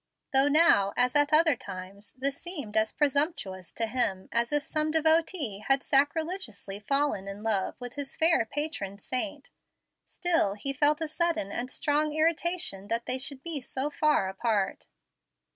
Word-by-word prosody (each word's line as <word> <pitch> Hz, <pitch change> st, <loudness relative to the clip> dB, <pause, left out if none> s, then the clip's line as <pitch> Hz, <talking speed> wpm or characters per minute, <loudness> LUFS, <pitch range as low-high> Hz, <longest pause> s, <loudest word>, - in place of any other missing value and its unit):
Though 270 Hz, +1 st, +5 dB
now, 290 Hz, -10 st, +4 dB
as 250 Hz, +2 st, +2 dB
at 290 Hz, 0 st, +4 dB
other 315 Hz, -1 st, +5 dB
times, 200 Hz, 0 st, -9 dB
this 275 Hz, +2 st, -2 dB
seemed 290 Hz, -, -5 dB
as 220 Hz, 0 st, +2 dB
presumptuous 280 Hz, -, -1 dB
to 230 Hz, -, -1 dB
him 220 Hz, -5 st, -1 dB
as 235 Hz, +2 st, 0 dB
if 295 Hz, -1 st, +1 dB
some 310 Hz, 0 st, -1 dB
devotee 315 Hz, -, +2 dB
had 270 Hz, 0 st, +3 dB
sacrilegiously 285 Hz, -, -1 dB
fallen 275 Hz, -4 st, -1 dB
in 200 Hz, +2 st, -7 dB
love 210 Hz, -4 st, 0 dB
with 245 Hz, -1 st, -7 dB
his 285 Hz, -1 st, -5 dB
fair 325 Hz, -6 st, +4 dB
patron 285 Hz, -10 st, -3 dB
saint, 280 Hz, +7 st, -3 dB, 0.6 s
still 330 Hz, -, +1 dB
he 275 Hz, +7 st, -3 dB
felt 295 Hz, +3 st, +2 dB
a 320 Hz, -, -1 dB
sudden 320 Hz, -, -1 dB
and 245 Hz, +4 st, -4 dB
strong 295 Hz, +3 st, 0 dB
irritation 325 Hz, -, 0 dB
that 230 Hz, +2 st, -2 dB
they 260 Hz, -, -1 dB
should 275 Hz, 0 st, -4 dB
be 325 Hz, -4 st, -3 dB
so 265 Hz, +3 st, -3 dB
far 300 Hz, -9 st, +2 dB
apart. 200 Hz, 0 st, -1 dB
275 Hz, 160 wpm, -28 LUFS, 210-310 Hz, 0.6 s, Though